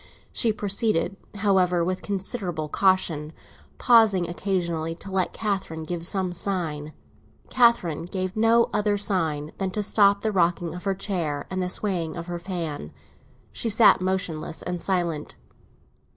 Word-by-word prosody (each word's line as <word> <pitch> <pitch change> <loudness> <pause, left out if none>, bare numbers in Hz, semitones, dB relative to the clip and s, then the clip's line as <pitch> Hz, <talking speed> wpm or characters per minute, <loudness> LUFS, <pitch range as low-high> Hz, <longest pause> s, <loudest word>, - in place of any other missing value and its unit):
She 230 - +2
proceeded, 205 -2 0 0.2
however, 185 -4 +2
with 185 +1 -2
considerable 190 -5 -3
caution, 165 -5 +1 0.4
pausing 220 -7 +5
occasionally 170 -3 -2
to 195 +3 -10
let 190 -1 0
Catherine 195 -7 -3
give 170 +1 -3
some 190 -2 -1
sign. 165 -5 -3 0.6
Catherine 185 - +3
gave 185 +2 -3
no 225 +1 +4
other 210 0 +1
sign 160 -7 -1
than 195 -1 0
to 210 +3 -2
stop 200 -1 +4
the 220 - 0
rocking 175 -3 +1
of 180 +2 -8
her 195 -1 +1
chair 175 -7 -2
and 185 0 -1
the 180 - -1
swaying 180 -5 -1
of 170 - -5
her 175 -1 -5
fan; 165 - -5 0.6
she 230 - -1
sat 220 -2 +6
motionless 180 -4 -2
and 180 -1 -3
silent. 170 -5 -1
185 Hz, 140 wpm, -25 LUFS, 165-200 Hz, 0.6 s, sat